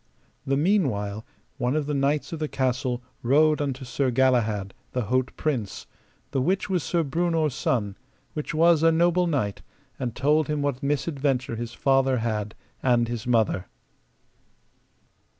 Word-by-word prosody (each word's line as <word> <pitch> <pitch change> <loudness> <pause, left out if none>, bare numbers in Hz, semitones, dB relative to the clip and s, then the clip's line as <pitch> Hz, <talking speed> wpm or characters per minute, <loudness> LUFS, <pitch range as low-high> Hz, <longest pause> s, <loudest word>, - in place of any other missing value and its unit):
The 135 0 +2
meanwhile 120 - 0 0.3
one 125 +3 0
of 155 -2 0
the 150 - -2
knights 140 +3 0
of 165 - -4
the 155 - -1
castle 125 -2 -1 0.2
rode 150 +5 +3
unto 135 -2 -3
Sir 130 +2 0
Galahad, 115 -6 +1 0.2
the 125 - 0
haut 130 +4 +1
prince, 125 -10 -2 0.5
the 135 - 0
which 190 +7 0
was 180 -2 +1
Sir 170 +1 0
Breunor's 160 0 0
son, 105 -8 -1 0.4
which 150 -3 -4
was 165 0 +4
a 165 0 +5
noble 175 +2 +3
knight, 125 -11 -1 0.4
and 120 -3 -3
told 150 +3 +2
him 150 -1 -1
what 140 -3 -1
misadventure 140 -4 -1
his 120 0 -6
father 135 -1 +2
had 110 -2 -2 0.3
and 120 -2 +3
his 120 0 -5
mother. 110 -6 +1
135 Hz, 150 wpm, -25 LUFS, 120-155 Hz, 0.5 s, a